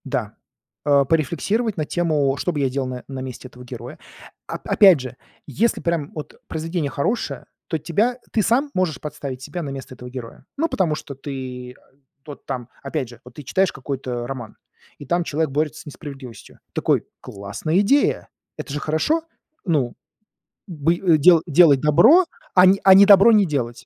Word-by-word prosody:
Да. - - -3 0.5
А, 140 -1 +4
порефлексировать 175 - 0
на 155 - -1
тему: 150 -5 0
что 180 - -1
бы 150 - -3
я 135 -2 +1
делал 135 0 -2
на 125 -1 -6
на 135 -1 -6
месте 130 0 -8
этого 125 0 -14
героя? 125 +2 -9 0.5
Оп - - -6
опять 190 -7 +6
же, 130 -1 -7 0.3
если 220 - 0
прям 170 -4 -2
от 150 - -7
произведение 165 -1 -3
хорошее, 150 - -2 0.2
то 160 - -1
тебя 205 - 0
ты 220 - +1
сам 260 +8 +1
можешь 175 -8 -1
подставить 140 -4 -7
себя 175 +6 -6
на 145 - -5
место 135 -1 -8
этого 125 0 -10
героя. 125 0 -9
Ну, 325 +3 +1
потому 175 - 0
что 145 - -8
ты, 130 -2 -7
а, - - -25 0.4
тот 145 -1 -11
там 125 -1 -5
опять 140 -2 -3
же, 120 -1 -14
вот 125 - -14
ты 150 - -9
читаешь 190 +8 +1
какой-то 130 -3 -5
роман, 120 -5 -7 0.4
и 145 - -10
там 175 +5 0
человек 155 -2 -2
борется 150 +2 -2
с - - -17
несправедливостью. 140 -5 -11
Такой: - - +1 0.2
"Классная 105 - -3
идея!" 275 +8 +2 0.3
Это 140 - -6
же 150 - -2
хорошо? 160 - 0 0.4
Ну. 145 -9 0 0.7
Бы 165 -2 0
э, 170 -3 +3
дела 165 +2 +6
делать 150 -4 +5
добро, 215 - +6 0.3
а - - +7
не 190 +1 +5
а 190 - +9
не 195 +1 +8
добро 200 +3 +7
не 210 -2 +5
делать. 125 -7 -3
150 Hz, 180 wpm, -21 LUFS, 130-180 Hz, 0.7 s, а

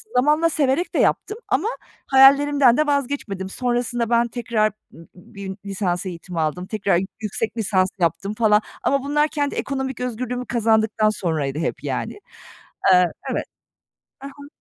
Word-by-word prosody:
zamanla 300 +6 +3
severek 300 +2 0
de - - +2
yaptım 425 - +1
ama 330 +11 +1 0.4
hayallerimden 275 -1 +6
de 305 0 +2
vazgeçmedim. 250 -9 -2
Sonrasında 240 0 -1
ben 235 0 +3
tekrar 230 -2 0 0.2
b - - -16 0.2
b 180 - -18
bir 195 -1 -7
lisans 190 -2 -2
eğitimi 175 -1 -6
aldım. 160 +3 -1
Tekrar 200 -4 +1 0.2
yüksek 220 +2 -3
lisans 190 -4 +2
yaptım 175 +4 0
falan, 215 -1 +3 0.2
ama 275 -1 +1
bunlar 295 +2 +2
kendi 290 -2 -2
ekonomik 265 -2 -3
özgürlüğümü 250 0 -3
kazandıktan 220 -2 +2
sonraydı 155 -8 -2
hep, 165 - -3
yani. - - -3 0.8
Eee, 180 0 +6 0.3
evet. - - -2 0.8
Hı - - -5
hı. 285 +1 -12
235 Hz, 145 wpm, -22 LUFS, 195-275 Hz, 0.8 s, hayallerimden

